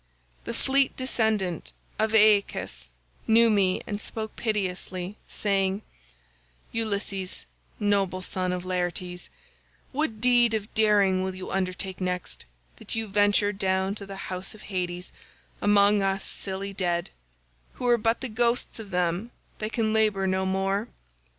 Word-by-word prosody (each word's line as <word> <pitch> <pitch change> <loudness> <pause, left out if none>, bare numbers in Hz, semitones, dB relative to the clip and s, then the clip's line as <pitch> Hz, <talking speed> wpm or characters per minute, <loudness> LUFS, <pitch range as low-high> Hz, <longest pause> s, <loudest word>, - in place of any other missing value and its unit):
The - - -3
fleet 270 0 +2
descendant 220 - 0 0.3
of 220 +1 +2
Aeacus 205 - +3 0.4
knew 230 +1 +6
me 195 -3 +2
and 205 0 -4
spoke 220 -1 -5
piteously, 190 -3 -2
saying, 195 0 0 0.9
'Ulysses, 200 -4 -3 0.3
noble 195 -3 +1
son 185 0 -2
of 180 0 -3
Laertes, 180 0 -2 0.6
what 265 -6 -1
deed 240 -1 +5
of 215 0 -4
daring 205 -4 +4
will 190 0 -2
you 185 - -6
undertake 190 0 -1
next, 180 - -3 0.3
that - - -7
you 225 0 -1
venture 205 0 +3
down 190 0 0
to 200 -1 -8
the 195 - -7 0.2
house 185 +3 -4
of 215 - -14
Hades 180 -1 -3 0.5
among 205 0 +5
us 195 0 0
silly 195 0 -4
dead, 175 -3 -1 0.6
who 250 - -6
are 240 -1 +5
but 225 +1 +1
the 265 - -2
ghosts 235 +1 0
of 215 -3 -8
them 180 +4 0 0.3
that 215 0 -3
can 220 -2 +1
labour 215 -3 +2
no 190 0 +1
more? 195 +3 0
200 Hz, 135 wpm, -27 LUFS, 185-220 Hz, 0.9 s, knew